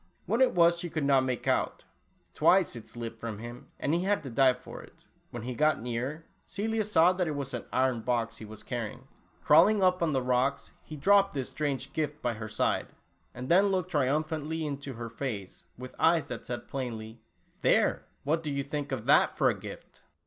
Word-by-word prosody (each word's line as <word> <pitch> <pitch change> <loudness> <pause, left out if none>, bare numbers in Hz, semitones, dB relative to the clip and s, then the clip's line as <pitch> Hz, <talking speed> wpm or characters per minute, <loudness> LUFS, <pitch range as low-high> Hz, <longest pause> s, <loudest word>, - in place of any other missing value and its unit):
What 225 +7 0
it 260 - +4
was 170 0 +5
she 175 - -4
could 155 -2 -2
not 135 -1 +4
make 125 -2 -3
out. - - 0 0.5
Twice - - +3
it - - -9
slipped 115 -1 -7
from 115 -2 -5
him 120 +3 -9
and 145 - 0
he 170 - +2
had 200 -4 +1
to 135 - -7
dive 130 +1 +4
for - - -10
it. - - -18 0.2
When 120 -2 -7
he 125 +1 -4
got 155 +5 +2
nearer, 125 +7 -4 0.2
Celia 215 +3 -2
saw 180 -3 +4
that 180 -1 -1
it 155 - -2
was 140 -2 -4
an 120 - -4
iron 130 -2 +1
box, 115 -1 -1
he 110 - -9
was 110 0 -11
carrying. 120 0 -5 0.4
Crawling 190 +7 +6
up 185 -1 +3
on 165 -2 +2
the 130 -3 0
rocks, 125 +2 0
he 155 - -9
dropped 195 +3 +4
this 135 -3 -3
strange 140 -2 -3
gift 150 -1 -2
by 120 -4 -1
her 110 0 -7
side, - - 0 0.5
and 125 +1 -6
then 190 +6 +5
looked 185 -2 -1
triumphantly 155 +2 0
into 140 -2 -5
her 115 0 -6
face 115 -5 -6
with 130 +1 -9
eyes 165 -1 +4
that 125 - -7
said 120 0 -5
plainly, 115 -4 -5 0.4
"There, - - +2 0.2
what 160 +3 +1
do 155 - -4
you 140 -1 -1
think 145 0 -4
of 130 -5 -3
that - - +4
for - - +4
a - - -4
gift - - -11
140 Hz, 205 wpm, -29 LUFS, 120-165 Hz, 0.5 s, Crawling